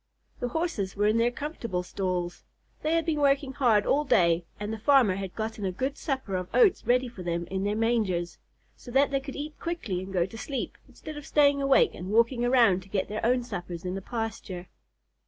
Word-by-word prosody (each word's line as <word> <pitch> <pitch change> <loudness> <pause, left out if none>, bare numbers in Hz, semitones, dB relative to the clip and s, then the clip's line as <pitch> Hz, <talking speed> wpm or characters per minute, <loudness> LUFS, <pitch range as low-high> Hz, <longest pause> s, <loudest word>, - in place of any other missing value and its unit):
The 245 - -1
Horses 245 - -2
were 205 +1 +1
in 215 +2 +3
their 235 +1 +4
comfortable 240 - -4
stalls. 180 -2 -3 0.4
They 310 +2 +1
had 330 - +1
been 315 -3 0
working 275 -1 +2
hard 235 -7 +3
all 295 +2 +2
day 170 - +3
and 210 +1 -3
the 220 - -5
farmer 245 -4 +5
had 195 -2 -5
gotten 220 -1 -4
a 190 - 0
good 265 +9 -2
supper 265 - -3
of 180 0 -5
oats 430 -6 +4
ready 250 +1 +3
for 235 -6 -10
them 170 -1 -2
in 190 0 -1
their 205 +1 0
mangers, 210 -7 0 0.4
so - - -13
that 275 +3 +3
they 275 - +1
could 270 0 -8
eat 300 +1 -6
quickly 280 - -3
and 190 +1 -7
go 180 -3 +2
to 210 +5 -10
sleep, 275 +1 -4
instead 310 -1 -9
of 295 - -9
staying 285 -1 +4
awake 275 - +4
and 185 - -7
walking 235 +3 +3
around 235 -7 +4
to 190 - -16
get 190 -1 -1
their 215 +1 -4
own 245 +2 +2
suppers 175 -6 -6
in 180 - -2
the 195 - -4
pasture. 220 -5 -5
225 Hz, 215 wpm, -28 LUFS, 190-275 Hz, 0.4 s, farmer